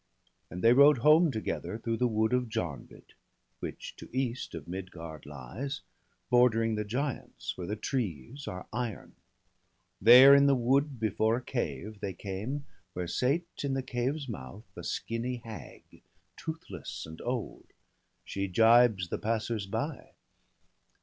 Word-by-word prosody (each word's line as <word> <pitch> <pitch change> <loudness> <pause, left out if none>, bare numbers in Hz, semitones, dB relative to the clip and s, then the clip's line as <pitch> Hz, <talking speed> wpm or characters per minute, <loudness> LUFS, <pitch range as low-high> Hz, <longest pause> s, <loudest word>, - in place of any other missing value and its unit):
And 90 - -7
they 115 +1 +7
rode 140 +2 +7
home 155 +3 +7
together, 110 -2 -3
through 115 0 -2
the 125 - +2
wood 110 +1 +1
Of 125 -2 +1
Jarnvid, 85 -9 -5 0.5
which - - -7
to - - -11
east 130 -5 -2
of 75 -3 -8
Midgard 85 -4 -7
lies 135 +7 -6 0.5
Bordering 115 -2 +4
the 105 0 -1
giants, 130 +6 -4
where 90 - -6
the 105 - -2
trees 115 - -4
are 90 0 -6
iron; 120 -2 -4 0.9
There 125 +6 +10
in 140 0 +7
the 140 - +5
wood 135 +2 +1
before 110 +1 +1
a 125 - -6
cave 105 - -4
they 100 -2 -3
came 105 +10 -5 0.3
Where 90 - -3
sate, 140 - +1 0.2
in 135 -1 0
the 135 - -1
cave's 130 +4 -2
mouth, 100 - -8
a - - -8
skinny 115 +2 -3
hag. 110 -2 -9 0.5
Toothless 160 - -7
and 80 0 -10
old; 125 -2 -4 0.6
she 100 0 -3
gibes 110 -2 +5
the - - -3
passers 110 -2 -1
by. 95 - -4
115 Hz, 145 wpm, -30 LUFS, 100-130 Hz, 0.9 s, There